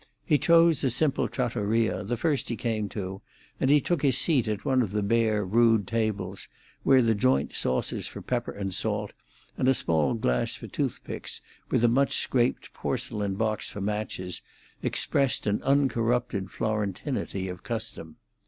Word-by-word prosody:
He 150 -4 +3
chose 165 0 +5
a 135 - +3
simple 140 +4 +1
trattoria, 115 -3 0
the 120 +5 -2
first 150 +2 0
he 120 - -1
came 110 -3 -2
to, 95 -1 -5 0.4
and 135 - +2
he 145 +1 +6
took 170 +1 -1
his 135 -3 +3
seat 140 -9 +2
at 105 -2 -3
one 130 -1 +3
of 105 -5 -2
the 105 -1 0
bare, 110 -1 +2
rude 115 +1 +4
tables, 110 -3 -2 0.3
where 130 -2 +5
the 115 -1 +3
joint 70 -9 +1
saucers 65 - -1
for - - -8
pepper - - -2
and 95 -2 -4
salt, 105 +1 -2 0.5
and 130 - +2
a 135 - +5
small 80 +3 +1
glass 60 - 0
for - - -9
toothpicks, - - -3 0.3
with - - +2
a - - +6
much 135 +4 +2
scraped 125 -1 0
porcelain 100 -3 -2
box 110 0 -1
for - - -7
matches, 100 -3 -3 0.4
expressed 140 -2 +1
an 105 0 0
uncorrupted 120 -7 +1
Florentinity 105 -1 -2
of 90 -1 -7
custom. 80 -1 -5
110 Hz, 160 wpm, -27 LUFS, 100-130 Hz, 0.5 s, he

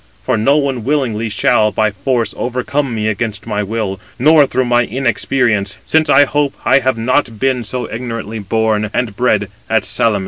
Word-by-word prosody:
For - - +1
no 135 +7 +3
one 135 -5 -1
willingly 120 -5 -1
shall, 105 +1 +2
by 110 0 +1
force, 115 +4 -1
overcome 125 +1 -2
me 110 -1 -1
against 110 -1 -3
my 105 -2 -2
will, 105 -2 -3 0.2
nor 150 +2 +5
through 130 0 0
my 120 0 +3
inexperience; 120 -5 0
since 160 -1 +2
I 145 +1 +6
hope 145 0 -1
I 130 +4 +5
have 130 -2 0
not 115 0 0
been 130 0 0
so 125 +3 -3
ignorantly 115 -2 -5
258 100 -2 -12
born 110 -1 +1
and 115 -5 -1
bred 125 +3 +1 0.2
at - - +1
Salamis." 110 -3 +1
120 Hz, 180 wpm, -16 LUFS, 110-130 Hz, 0.2 s, I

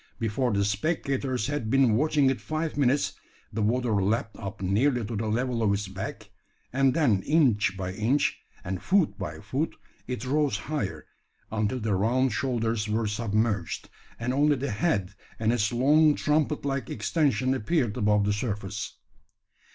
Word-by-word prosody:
Before 120 +2 0
the 100 -1 +1
spectators 130 - -1
had 145 -6 -2
been 135 -2 +4
watching 145 +1 +3
it 135 - -4
five 155 0 -3
minutes, 140 0 +2 0.4
the 110 - -1
water 110 -1 +1
lapped 110 +2 0
up 100 -3 -6
nearly 115 +6 +1
to 115 +2 -4
the 110 +1 -2
level 120 +2 0
of 105 -2 +3
its 100 0 -1
back, 95 0 -7 0.4
and 135 0 +3
then 120 -12 +3
inch 110 - +2
by 95 -1 -3
inch, 115 +9 +1 0.2
and 95 0 -4
foot 190 -4 +2
by 100 - -5
foot, 130 +10 -2 0.3
it 125 -1 -4
rose 145 +2 +1
higher, 145 -10 -4 0.5
until 110 +3 0
the 110 -2 -1
round 120 +6 +2
shoulders 115 -4 -1
were 110 +1 0
submerged, 105 -2 -1 0.3
and 125 +2 -1
only 145 +2 +3
the 135 -1 -3
head 105 - 0 0.2
and 110 +1 +1
its 105 -4 +1
long 145 +5 +4
trumpet 150 -1 0
like 135 -2 -2
extension 130 +1 +1
appeared 130 -2 0
above 105 -3 +2
the 105 - +2
surface. 105 -1 -4
120 Hz, 160 wpm, -27 LUFS, 105-140 Hz, 0.5 s, been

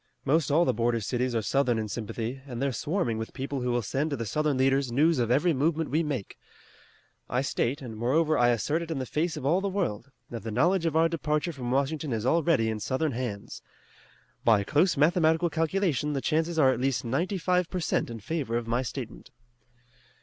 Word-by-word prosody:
Most 150 +2 +2
all 160 +4 +4
the - - +2
border 115 +1 +1
cities 125 +3 -1
are 110 - 0
Southern 125 +2 +1
in 110 -1 -2
sympathy, 115 +4 -4
and 120 -3 -6
they're 140 +1 0
swarming 130 - -1
with 110 - -6
people 135 0 -3
who 125 - -1
will 120 -1 0
send 140 +9 -1
to 145 - -2
the 115 - -3
Southern 150 +5 0
leaders 135 -1 +2
news 150 +4 +3
of 120 -2 +1
every 150 +7 +3
movement 155 +3 0
we 155 +3 +2
make. 140 -10 -4 0.9
I 125 - +1
state, 140 +1 -1
and 115 -3 -7
moreover 150 +8 +2
I 120 -3 +4
assert 120 - 0
it 170 - -6
in 160 - -2
the 130 - -2
face 160 +5 -1
of - - -6
all 170 +7 +3
the 200 - -1
world, 140 - -2 0.2
that 115 -2 -5
the 110 - -5
knowledge 165 - +2
of 160 - -2
our 165 +1 +5
departure 155 0 -1
from 125 -4 -5
Washington 140 +2 0
is 110 0 -2
already 155 -5 +2
in 110 -1 -2
Southern 135 +7 -1
hands. 115 -5 -5 0.8
By 110 -3 +4
close 155 - +2
mathematical 160 +2 +3
calculation 160 -3 0
the 140 - -1
chances 160 +2 0
are 135 -4 +5
at 125 - -2
least 135 -3 0
ninety 165 - -1
five 180 0 +1
per 185 - -3
cent 160 - 0
in 115 -2 -7
favor 130 -2 -2
of 120 - -3
my 120 +2 0
statement." 125 -2 -7
140 Hz, 215 wpm, -27 LUFS, 120-160 Hz, 0.9 s, our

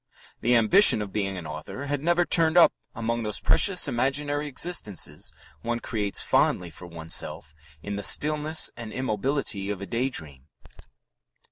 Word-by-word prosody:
The 120 +1 +1
ambition 120 - +7
of 100 - -10
being 95 -2 -3
an 85 - -8
author 75 - -8
had 145 -1 -3
never 175 +1 +2
turned 165 0 +2
up 175 - +6 0.2
among 115 +1 -3
those 105 -2 -2
precious 190 -3 +3
imaginary 145 +4 -2
existences 135 - -3 0.3
one 120 0 -3
creates 105 -4 -3
fondly 90 -2 0
for 90 +3 -11
oneself 80 -2 -3 0.3
in 100 0 -5
the - - -4
stillness 155 +7 +3
and 115 -2 -9
immobility 125 -4 -3
of 100 -2 -4
a 100 - -7
daydream." 80 - -4
115 Hz, 145 wpm, -25 LUFS, 100-145 Hz, 0.3 s, ambition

